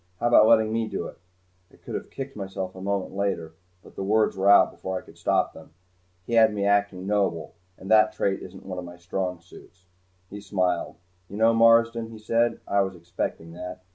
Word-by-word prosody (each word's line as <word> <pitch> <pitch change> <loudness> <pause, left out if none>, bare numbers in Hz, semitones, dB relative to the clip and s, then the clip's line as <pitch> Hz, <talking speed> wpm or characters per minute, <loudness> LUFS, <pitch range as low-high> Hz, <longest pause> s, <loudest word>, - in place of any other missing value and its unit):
"How 120 - +1
about 110 -2 +7
letting 110 -1 +4
me 115 0 0
do 100 - -4
it?" - - -10 0.5
I - - -20
could - - -10
have - - -5
kicked 135 0 -7
myself 95 -2 -5
a 95 - -11
moment 100 -1 -2
later, 95 -5 -2 0.3
but - - -17
the - - -4
words 110 +2 +2
were 95 +1 +2
out 100 - +7
before 95 0 -5
I - - -6
could - - -16
stop - - 0
them. 80 - -15 0.5
He 120 - -5
had 110 -2 +5
me 100 -1 -1
acting 100 -2 +1
noble, 95 -6 -1 0.2
and 95 - -11
that 110 0 +6
trait 95 -1 -1
isn't 95 +1 -11
one 95 -1 -5
of - - -6
my 90 0 -10
strong 90 0 -3
suits. 90 +1 -17 0.5
He 105 +1 -8
smiled. 90 -3 -1 0.3
"You 100 - -7
know, 115 +1 +4
Marsden," 115 0 +4
he 115 - -10
said, 115 +2 0
"I 100 - +2
was 95 -1 -2
expecting 85 -1 -5
that." 90 +1 -8
100 Hz, 210 wpm, -25 LUFS, 90-110 Hz, 0.5 s, about